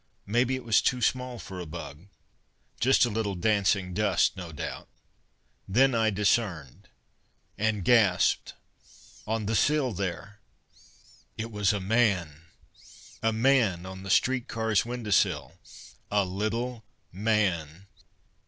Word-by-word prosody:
Maybe 120 Hz, +5 st, +1 dB
it 130 Hz, -, -6 dB
was 115 Hz, -3 st, +3 dB
too 125 Hz, -, +1 dB
small 125 Hz, +1 st, -1 dB
for 95 Hz, -4 st, -8 dB
a 90 Hz, -, -6 dB
bug. 80 Hz, +1 st, -9 dB, 0.7 s
Just 130 Hz, +1 st, +4 dB
a -, -, -2 dB
little 105 Hz, -2 st, -2 dB
dancing 100 Hz, -1 st, +1 dB
dust, 100 Hz, -2 st, +2 dB
no 90 Hz, -3 st, -7 dB
doubt. 75 Hz, -, -7 dB, 0.8 s
Then 130 Hz, +7 st, +3 dB
I 110 Hz, -1 st, +2 dB
discerned 95 Hz, -, -1 dB, 0.7 s
and 105 Hz, -3 st, -1 dB
gasped. 105 Hz, -6 st, +3 dB, 0.7 s
On 110 Hz, 0 st, -2 dB
the 110 Hz, -, -1 dB
sill, 145 Hz, +1 st, +2 dB
there 100 Hz, +2 st, -5 dB, 1.0 s
it 115 Hz, +1 st, -5 dB
was 105 Hz, -2 st, +1 dB
a 105 Hz, -, -2 dB
man! 95 Hz, -7 st, 0 dB, 0.8 s
A 115 Hz, -, +2 dB
man 110 Hz, -6 st, +2 dB
on 95 Hz, 0 st, -8 dB
the 95 Hz, -, -8 dB
streetcar's 115 Hz, -2 st, +1 dB
window 120 Hz, -3 st, -5 dB
sill 100 Hz, -, +1 dB, 0.5 s
a 100 Hz, -1 st, +2 dB
little 110 Hz, +5 st, -3 dB, 0.3 s
man! 95 Hz, -5 st, -1 dB
105 Hz, 125 wpm, -27 LUFS, 95-115 Hz, 1.0 s, Just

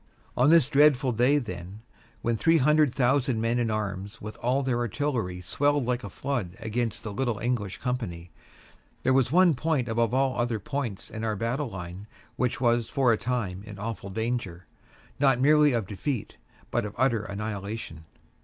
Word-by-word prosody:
On 125 Hz, +4 st, +4 dB
this 165 Hz, -2 st, +6 dB
dreadful 140 Hz, -2 st, +4 dB
day, 125 Hz, +5 st, +3 dB
then, 95 Hz, -4 st, -6 dB, 0.4 s
when 120 Hz, 0 st, +1 dB
three 165 Hz, +8 st, +4 dB
hundred 150 Hz, 0 st, +4 dB
thousand 130 Hz, -2 st, +1 dB
men 115 Hz, +2 st, +1 dB
in 120 Hz, -2 st, 0 dB
arms 100 Hz, 0 st, -3 dB
with 105 Hz, +1 st, -7 dB
all 130 Hz, +3 st, +1 dB
their 125 Hz, -2 st, 0 dB
artillery 120 Hz, -7 st, -2 dB
swelled 145 Hz, +9 st, +1 dB
like 125 Hz, 0 st, -1 dB
a -, -, -6 dB
flood 110 Hz, -11 st, -3 dB
against 115 Hz, +1 st, -2 dB
the 105 Hz, -, -5 dB
little 120 Hz, -2 st, -1 dB
English 110 Hz, -4 st, -2 dB
company, 100 Hz, -10 st, -4 dB, 0.7 s
there 130 Hz, -, +3 dB
was 130 Hz, -2 st, +3 dB
one 180 Hz, 0 st, +5 dB
point 145 Hz, -2 st, 0 dB
above 115 Hz, 0 st, +1 dB
all 130 Hz, -1 st, +1 dB
other 120 Hz, -1 st, 0 dB
points 115 Hz, -1 st, -4 dB
in 110 Hz, -, -5 dB
our 110 Hz, -1 st, 0 dB
battle 120 Hz, +6 st, -2 dB
line 90 Hz, +1 st, -8 dB, 0.3 s
that 125 Hz, -1 st, 0 dB
was 120 Hz, -2 st, +2 dB
for 130 Hz, -4 st, +3 dB
a -, -, +3 dB
time 115 Hz, -6 st, -2 dB
in 105 Hz, -1 st, -10 dB
awful 100 Hz, -1 st, -5 dB
danger, 100 Hz, -5 st, -3 dB, 0.5 s
not 135 Hz, -3 st, +4 dB
merely 150 Hz, +2 st, +5 dB
of 115 Hz, -4 st, 0 dB
defeat, 110 Hz, +5 st, -4 dB, 0.3 s
but -, -, +1 dB
of 105 Hz, -1 st, -6 dB
utter 120 Hz, -3 st, +2 dB
annihilation. 100 Hz, -5 st, -5 dB
120 Hz, 175 wpm, -27 LUFS, 105-135 Hz, 0.7 s, this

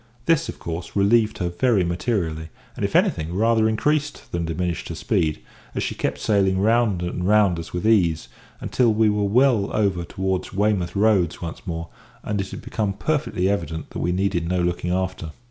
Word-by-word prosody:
This, 165 Hz, 0 st, +2 dB
of -, -, -6 dB
course, 85 Hz, +1 st, -6 dB
relieved 105 Hz, +2 st, +3 dB
her 90 Hz, -2 st, -1 dB
very 105 Hz, +2 st, +2 dB
materially, 85 Hz, -3 st, -2 dB, 0.3 s
and, -, -, -5 dB
if -, -, -1 dB
anything, 80 Hz, +3 st, +1 dB
rather 110 Hz, +1 st, +3 dB
increased 145 Hz, +6 st, -1 dB
than 85 Hz, -1 st, -2 dB
diminished 85 Hz, +1 st, -3 dB
her 85 Hz, -, -4 dB
speed, 80 Hz, -1 st, 0 dB, 0.4 s
as -, -, -1 dB
she -, -, -2 dB
kept -, -, -2 dB
sailing 95 Hz, -3 st, +2 dB
round 110 Hz, -3 st, +2 dB
and 90 Hz, +1 st, -2 dB
round 100 Hz, -5 st, +4 dB
us 80 Hz, -, -8 dB
with 90 Hz, +4 st, -3 dB
ease, 85 Hz, -, +3 dB, 0.3 s
until 120 Hz, -3 st, +2 dB
we 110 Hz, 0 st, +3 dB
were 105 Hz, 0 st, 0 dB
well 115 Hz, -1 st, +3 dB
over 100 Hz, -5 st, +1 dB
towards 95 Hz, +2 st, -3 dB
Weymouth 100 Hz, -3 st, 0 dB
Roads 100 Hz, -5 st, +2 dB
once 85 Hz, +3 st, -7 dB
more, 85 Hz, -1 st, -4 dB, 0.3 s
and 105 Hz, -2 st, -1 dB
it 95 Hz, -, -6 dB
had -, -, -8 dB
become 105 Hz, -3 st, -2 dB
perfectly 140 Hz, -6 st, -1 dB
evident 85 Hz, -6 st, -2 dB
that -, -, -5 dB
we 90 Hz, -, 0 dB
needed 90 Hz, -2 st, 0 dB
no 90 Hz, 0 st, +1 dB
looking 90 Hz, 0 st, -1 dB
after. 95 Hz, -3 st, -2 dB
95 Hz, 185 wpm, -23 LUFS, 85-110 Hz, 0.4 s, round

